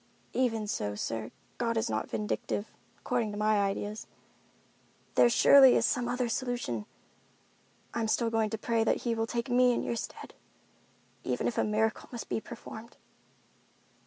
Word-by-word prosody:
"Even 225 Hz, -4 st, +1 dB
so, 105 Hz, -, -2 dB
sir, 110 Hz, +1 st, -3 dB, 0.3 s
God 230 Hz, -1 st, 0 dB
is 225 Hz, +1 st, +1 dB
not -, -, -2 dB
vindictive, 210 Hz, 0 st, -3 dB, 0.3 s
according 235 Hz, -4 st, -1 dB
to 205 Hz, -, -6 dB
my 215 Hz, 0 st, +2 dB
ideas. 205 Hz, +2 st, -3 dB, 1.1 s
There 240 Hz, -, +6 dB
surely 265 Hz, +2 st, +7 dB
is 230 Hz, -, +3 dB
some 245 Hz, -1 st, 0 dB
other 250 Hz, 0 st, 0 dB
solution. 235 Hz, -, -3 dB, 1.1 s
I'm 230 Hz, -1 st, -1 dB
still 230 Hz, +1 st, +1 dB
going 225 Hz, -1 st, +1 dB
to 220 Hz, -, -3 dB
pray 225 Hz, +1 st, +1 dB
that 225 Hz, -, 0 dB
He 235 Hz, -, +1 dB
will 225 Hz, 0 st, -1 dB
take 235 Hz, +1 st, -2 dB
me 250 Hz, 0 st, +5 dB
in -, -, -1 dB
your -, -, -2 dB
stead, -, -, -7 dB, 0.9 s
even -, -, -2 dB
if 235 Hz, -, -1 dB
a -, -, +3 dB
miracle 220 Hz, +1 st, 0 dB
must 240 Hz, -2 st, -7 dB
be -, -, -1 dB
performed." 230 Hz, -1 st, -10 dB
225 Hz, 160 wpm, -30 LUFS, 215-240 Hz, 1.1 s, surely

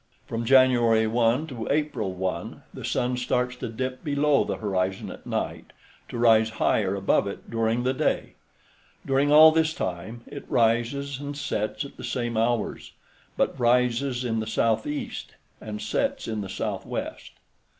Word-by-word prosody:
From 115 Hz, 0 st, -3 dB
January 120 Hz, -3 st, +5 dB
1 115 Hz, +5 st, +2 dB
to 125 Hz, -8 st, -6 dB
April 145 Hz, -10 st, 0 dB
1, 95 Hz, 0 st, -4 dB
the -, -, -8 dB
sun 125 Hz, 0 st, 0 dB
starts 125 Hz, 0 st, 0 dB
to 125 Hz, -, -5 dB
dip 130 Hz, +3 st, -4 dB
below 145 Hz, -1 st, +2 dB
the -, -, -3 dB
horizon 95 Hz, -2 st, -2 dB
at -, -, -11 dB
night, -, -, -4 dB, 0.4 s
to -, -, -5 dB
rise 110 Hz, -2 st, +5 dB
higher 100 Hz, -3 st, +2 dB
above 100 Hz, 0 st, +2 dB
it 100 Hz, -, -8 dB
during 115 Hz, +1 st, 0 dB
the 130 Hz, +1 st, +1 dB
day. -, -, -1 dB, 0.7 s
During 140 Hz, +1 st, +2 dB
all 155 Hz, +1 st, +9 dB
this 160 Hz, 0 st, +1 dB
time 95 Hz, +6 st, -4 dB
it -, -, -10 dB
rises 120 Hz, +4 st, +1 dB
and 145 Hz, 0 st, -6 dB
sets 140 Hz, -2 st, -2 dB
at 140 Hz, -, -12 dB
the -, -, -9 dB
same 120 Hz, -2 st, -2 dB
hours, 115 Hz, 0 st, -1 dB, 0.4 s
but -, -, 0 dB
rises 125 Hz, +1 st, +2 dB
in 115 Hz, -2 st, 0 dB
the 110 Hz, -, -3 dB
southeast 115 Hz, +6 st, -1 dB, 0.3 s
and 105 Hz, -1 st, -6 dB
sets -, -, -1 dB
in 110 Hz, -2 st, -2 dB
the 100 Hz, -, -6 dB
southwest. -, -, -4 dB
120 Hz, 155 wpm, -26 LUFS, 110-135 Hz, 0.7 s, all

